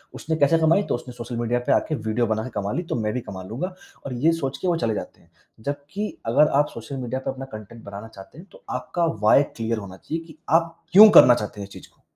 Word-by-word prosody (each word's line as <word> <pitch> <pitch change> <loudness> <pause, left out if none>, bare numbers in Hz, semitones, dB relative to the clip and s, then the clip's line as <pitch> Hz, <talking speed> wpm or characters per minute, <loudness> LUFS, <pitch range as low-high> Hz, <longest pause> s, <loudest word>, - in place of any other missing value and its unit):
उसने 160 0 -3
कैसे 150 +3 +4
कमाई? 165 +6 +3
तो - - -1
उसने 125 0 -8
सोशल 120 0 -7
मीडिया 120 +1 0
पे - - +3
आके 155 - 0
वीडियो 110 0 -1
बनाके 110 +3 -2
कमा 100 0 -2
ली, 175 - -2
तो 165 - -4
मैं 105 -2 -1
भी 125 - -2
कमा 95 -5 -8
लूँगा 180 - -4 0.3
और 135 - -4
ये 145 +7 +2
सोचके 150 +2 -3
वो 175 - +2
चले 115 -7 0
जाते - - -7
हैं। - - -27 0.3
जबकि 145 - -4 0.2
अगर 150 +6 +5
आप 150 - +3
सोशल 115 +4 -7
मीडिया 130 0 -3
पर 135 - -3
अपना 135 0 -7
कंटेंट 110 +2 -11
बनाना 100 +2 -8
चाहते 100 +4 -14
हैं 180 - -12
तो - - -17
आपका 165 +7 -1 0.2
व्हाय 135 +6 +6
क्लियर 115 0 -2
होना 95 -3 -8
चाहिए 165 +9 -5
कि 155 -2 -15
आप 165 +1 +2 0.2
क्यों 210 +2 +11
करना 125 - +9
चाहते 105 -2 -5
हैं 100 - -6
इस - - -16
चीज़ - - -12
को? - - -34
125 Hz, 250 wpm, -23 LUFS, 110-160 Hz, 0.3 s, क्यों